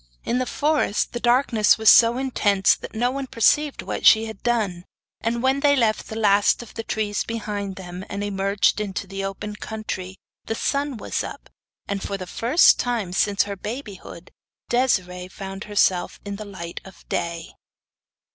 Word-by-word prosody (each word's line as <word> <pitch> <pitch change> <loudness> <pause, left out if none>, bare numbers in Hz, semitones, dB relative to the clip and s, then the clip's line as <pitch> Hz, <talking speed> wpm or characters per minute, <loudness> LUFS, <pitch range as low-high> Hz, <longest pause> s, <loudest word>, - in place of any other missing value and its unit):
In 245 - 0
the 255 - -1
forest 295 -8 0
the 240 - -3
darkness 240 -3 +3
was 220 0 -2
so 230 +3 +7
intense 205 -7 +2
that - - -10
no 245 +3 +1
one 275 0 -4
perceived 285 +5 +2
what - - -4
she 220 0 +7
had 220 -3 -8
done, 210 -8 -1 0.4
but 235 +1 -1
when 265 +2 +2
they 285 0 +4
left 225 -5 +1
the 220 - -6
last 205 +1 +3 0.2
trees 210 -1 -1
behind 205 -4 -4
them, 180 -1 -8
and 200 0 -4
emerged 200 +1 +1
into 200 -1 -4
the 195 +1 -5
open 195 +2 -5
country, 190 -5 -6 0.3
the 225 - -2
sun 280 +1 -1
was - - -3
up, - - -9 0.4
and 200 -1 -3
for 200 - -3
the 185 - -6
first 240 - +4
time 230 -7 -2
since 200 +1 +2
her 200 0 -5
babyhood, 205 -5 -8 0.4
Desiree 185 -8 0
found 195 +1 -8
herself 190 -4 +1
in 200 0 -5
the 215 - -7
light 170 -4 -7
of 190 - -15
day. 170 -1 -3
210 Hz, 165 wpm, -23 LUFS, 195-240 Hz, 0.4 s, so